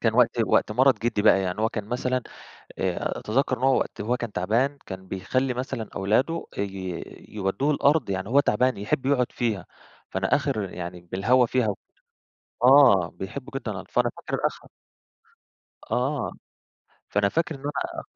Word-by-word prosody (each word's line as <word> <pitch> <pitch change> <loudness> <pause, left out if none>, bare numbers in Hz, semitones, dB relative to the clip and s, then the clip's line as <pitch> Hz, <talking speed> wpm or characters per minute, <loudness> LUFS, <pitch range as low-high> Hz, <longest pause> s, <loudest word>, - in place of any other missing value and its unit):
كان 115 -1 +1
وقت 125 -2 +5 0.2
وقت - - +2
مَرَض 130 0 +4
جِدّي 115 -2 0
بقى. 95 - +6
يعني 90 +3 -2
هو 110 - +3
كان 105 -2 -4
مثلًا 125 +2 -1 0.6
آآ - - -1
أتذكّر 130 +3 0
إن 125 - -10
هو 135 -1 +4
وقت - - -4
وهو 115 +4 0
كان 120 -3 -5
تعبان، 120 +10 0
كان 95 -1 -8
بيخلّي 125 +8 -1
مثلًا 125 -3 -4
أولاده 120 +12 +1
اي 95 -3 -4 0.3
يودّوه 105 +8 -1
الأرض. 145 -5 +2
يعني 95 +1 -2
هو 140 +4 +5
تعبان 125 0 +2
يحب 110 +6 -1
يقعُد 130 -3 +2
فيها. 110 -7 -2 0.4
فأنا - - +1
آخر 100 -4 -2
يعني 90 0 -6
بالهوا 100 +9 +2
فيها 125 -2 +1
و 100 - 0 0.9
آه. 125 - +7
بيحبه 125 +8 -7
جدًا. 125 -5 -3
فأنا 120 -1 +1
فاكر - - -2
آخر - - -6 1.2
آه. 135 +4 0 0.8
فأنا 100 0 +2
فاكر 160 +6 -1
إنه 135 - -11 0.2
أنا - - -5
115 Hz, 160 wpm, -25 LUFS, 100-130 Hz, 1.2 s, آه